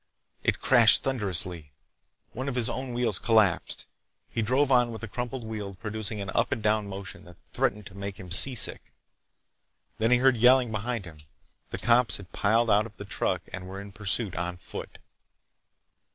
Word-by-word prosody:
It - - 0
crashed - - +6
thunderously. 90 - -1 0.6
One 130 +4 -4
of 130 - -5
his 120 -1 +1
own 130 -1 -5
wheels 115 -6 -1
collapsed. 110 -6 +1 0.5
He 115 - -2
drove 130 +5 +1
on 125 -2 +3
with 110 - -8
the 110 - -6
crumpled 120 +3 -5
wheel 105 -3 -6
producing 110 0 -5
an 100 -2 -5
up 115 - 0
and 115 -6 -3
down 105 -1 +1
motion 95 -1 -9
that - - -15 0.2
threatened 105 0 -1
to 100 - -11
make 100 0 -7
him 90 -3 -11
seasick. 120 +7 +5 1.1
Then 110 +1 +1
he 125 - +5
heard 130 0 +3
yelling 125 0 +4
behind 110 0 -3
him. 80 -3 -13 0.5
The - - -5
cops 120 0 +2
had 95 -2 -14
piled 115 +2 +1
out 105 +2 +3
of 105 - -20
the 105 - -8
truck - - -2
and 90 0 -7
were 95 +1 -8
in 100 0 -10
pursuit 105 0 +1
on 90 +1 -4
foot. 90 - -9
110 Hz, 180 wpm, -27 LUFS, 100-120 Hz, 1.1 s, crashed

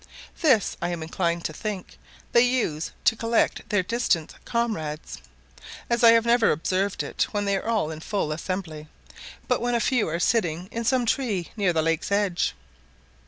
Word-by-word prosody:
This, 260 - +3
I 175 - -1
am 170 -2 -3
inclined 170 +1 -1
to 155 - -2
think, 200 +2 -6 0.3
they 235 - +6
use 240 -11 0
to 225 - +4
collect 230 +1 0
their 205 -3 +2
distant 200 -6 0
comrades, 160 -11 -3 0.7
as 235 0 +1
I 230 - +10
have 230 0 +4
never 235 -1 +4
observed 185 +5 0
it - - -1
when 205 -1 -2
they 200 0 +1
were 225 - -5
all 210 -9 +1
in 155 - -7
full 175 -2 -2
assembly, 160 -2 -4 0.6
but - - +1
when 240 0 0
a - - +2
few 245 -1 +1
were 165 +2 -2
sitting 180 -3 0
in 230 0 -3
some 255 0 +2
tree 220 -8 -1
near 200 -5 +2
the 160 -2 +1
lake's 165 +3 -1
edge. 200 - +1
200 Hz, 175 wpm, -25 LUFS, 165-230 Hz, 0.7 s, I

